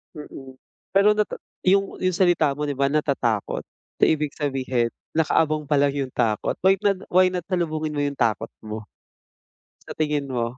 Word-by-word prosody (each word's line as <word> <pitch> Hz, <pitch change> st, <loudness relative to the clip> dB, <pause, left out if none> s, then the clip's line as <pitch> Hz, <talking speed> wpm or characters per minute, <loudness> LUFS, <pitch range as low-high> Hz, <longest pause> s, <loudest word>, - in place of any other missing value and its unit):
Mm, 135 Hz, -3 st, -10 dB, 0.4 s
pero 200 Hz, +2 st, +6 dB
natat 210 Hz, 0 st, -1 dB, 0.3 s
yung 195 Hz, +1 st, +2 dB
yung 185 Hz, -1 st, 0 dB
salita 170 Hz, -6 st, +3 dB
mo, 150 Hz, -, -4 dB
'di 145 Hz, -, -1 dB
ba 140 Hz, 0 st, +2 dB
natatakot? 135 Hz, -7 st, 0 dB, 0.4 s
So -, -, +1 dB
ibig 150 Hz, -2 st, +1 dB
sabihin, 130 Hz, -4 st, 0 dB, 0.2 s
nakaabang 155 Hz, -1 st, +1 dB
pa 145 Hz, -, +2 dB
lang 140 Hz, 0 st, +3 dB
yung 135 Hz, -2 st, -2 dB
takot. 110 Hz, -4 st, 0 dB
Why 190 Hz, +1 st, +6 dB
not 200 Hz, -1 st, +2 dB
why 185 Hz, +1 st, +6 dB
not 180 Hz, -2 st, -3 dB
salubungin 155 Hz, -4 st, -1 dB
mo -, -, -1 dB
yung 140 Hz, 0 st, -2 dB
takot 115 Hz, -4 st, +1 dB, 0.2 s
mo? 110 Hz, 0 st, -6 dB, 1.0 s
Sa -, -, -6 dB
tingin 150 Hz, -2 st, -1 dB
mo? 120 Hz, 0 st, -2 dB
150 Hz, 170 wpm, -23 LUFS, 130-175 Hz, 1.0 s, pero